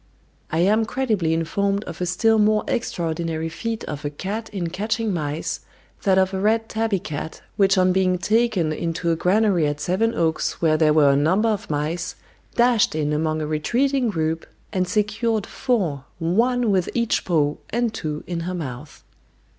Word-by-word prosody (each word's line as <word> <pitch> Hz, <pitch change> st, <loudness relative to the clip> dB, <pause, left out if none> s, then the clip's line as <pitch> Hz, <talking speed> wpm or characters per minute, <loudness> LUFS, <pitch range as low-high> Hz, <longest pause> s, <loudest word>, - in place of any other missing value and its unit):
I 160 Hz, -, +1 dB
am 215 Hz, +5 st, +3 dB
credibly 220 Hz, -9 st, 0 dB
informed 200 Hz, +5 st, 0 dB
of -, -, -8 dB
a 180 Hz, -, 0 dB
still 220 Hz, +5 st, +3 dB
more 210 Hz, 0 st, +3 dB
extraordinary 165 Hz, -5 st, -2 dB
feat 225 Hz, +6 st, -4 dB
of 150 Hz, -1 st, -6 dB
a 145 Hz, -, -1 dB
cat 200 Hz, +9 st, -5 dB
in 175 Hz, -5 st, -3 dB
catching 220 Hz, +3 st, -1 dB
mice, 150 Hz, -2 st, -2 dB, 0.4 s
that 190 Hz, -2 st, +3 dB
of 190 Hz, 0 st, +2 dB
a 190 Hz, -, -1 dB
red 220 Hz, +3 st, +2 dB
tabby 220 Hz, -2 st, 0 dB
cat 155 Hz, -2 st, -6 dB
which 195 Hz, -1 st, +3 dB
on 185 Hz, 0 st, +4 dB
being 185 Hz, -1 st, +2 dB
taken 205 Hz, -4 st, +1 dB
into 170 Hz, +1 st, -1 dB
a -, -, +2 dB
granary 180 Hz, -1 st, +2 dB
at 145 Hz, 0 st, -2 dB
Sevenoaks 180 Hz, -2 st, 0 dB
where 160 Hz, -2 st, +3 dB
there 155 Hz, -1 st, +4 dB
were 150 Hz, -2 st, +5 dB
a -, -, +3 dB
number 185 Hz, +10 st, +3 dB
of 210 Hz, -3 st, -2 dB
mice, 155 Hz, +3 st, -2 dB, 0.4 s
dashed 240 Hz, -7 st, +3 dB
in 150 Hz, -1 st, 0 dB
among 155 Hz, 0 st, 0 dB
a -, -, -2 dB
retreating 245 Hz, -, +1 dB
group, 160 Hz, -3 st, -2 dB, 0.3 s
and 185 Hz, -2 st, 0 dB
secured 215 Hz, +1 st, 0 dB
four, 180 Hz, -, -1 dB
one 230 Hz, +7 st, +2 dB
with 185 Hz, -3 st, +1 dB
each 235 Hz, -2 st, +1 dB
paw 150 Hz, -5 st, +1 dB
and 235 Hz, 0 st, 0 dB
two 150 Hz, -1 st, -4 dB
in 175 Hz, -2 st, -3 dB
her 185 Hz, -, -3 dB
mouth. 145 Hz, -2 st, -7 dB
185 Hz, 170 wpm, -23 LUFS, 160-220 Hz, 0.4 s, were